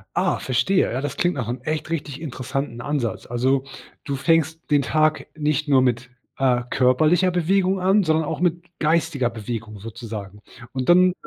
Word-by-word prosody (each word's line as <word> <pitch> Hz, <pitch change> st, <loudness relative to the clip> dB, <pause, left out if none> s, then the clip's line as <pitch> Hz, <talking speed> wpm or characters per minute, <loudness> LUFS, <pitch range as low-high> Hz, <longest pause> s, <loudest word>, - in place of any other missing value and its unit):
Ah, -, -, +1 dB
verstehe. 185 Hz, +9 st, +1 dB
Ja, 130 Hz, -, -2 dB
das 145 Hz, -1 st, -4 dB
klingt 175 Hz, -2 st, +1 dB
nach 125 Hz, -5 st, -3 dB
'nem 120 Hz, +1 st, -3 dB
echt 155 Hz, +2 st, -3 dB
richtig 150 Hz, -3 st, -4 dB
interessanten 130 Hz, -4 st, -4 dB
Ansatz. 135 Hz, -6 st, -2 dB
Also, 130 Hz, +3 st, +1 dB, 0.4 s
du 140 Hz, -, -3 dB
fängst 165 Hz, +2 st, +1 dB
den 145 Hz, -2 st, +3 dB
Tag 155 Hz, +1 st, +1 dB
nicht 150 Hz, -1 st, 0 dB
nur 135 Hz, -2 st, +5 dB
mit, 125 Hz, 0 st, 0 dB, 0.3 s
äh, 125 Hz, -2 st, +2 dB
körperlicher 155 Hz, +8 st, +3 dB
Bewegung 185 Hz, +2 st, +1 dB
an, 190 Hz, +2 st, +3 dB
sondern 160 Hz, 0 st, +2 dB
auch 160 Hz, 0 st, -3 dB
mit 175 Hz, -1 st, +1 dB, 0.2 s
geistiger 155 Hz, -6 st, +1 dB
Bewegung 110 Hz, -1 st, -6 dB
sozusagen. 105 Hz, -2 st, -8 dB, 0.3 s
Und 130 Hz, -1 st, -3 dB
dann, 180 Hz, +1 st, +6 dB
145 Hz, 165 wpm, -23 LUFS, 125-165 Hz, 0.4 s, dann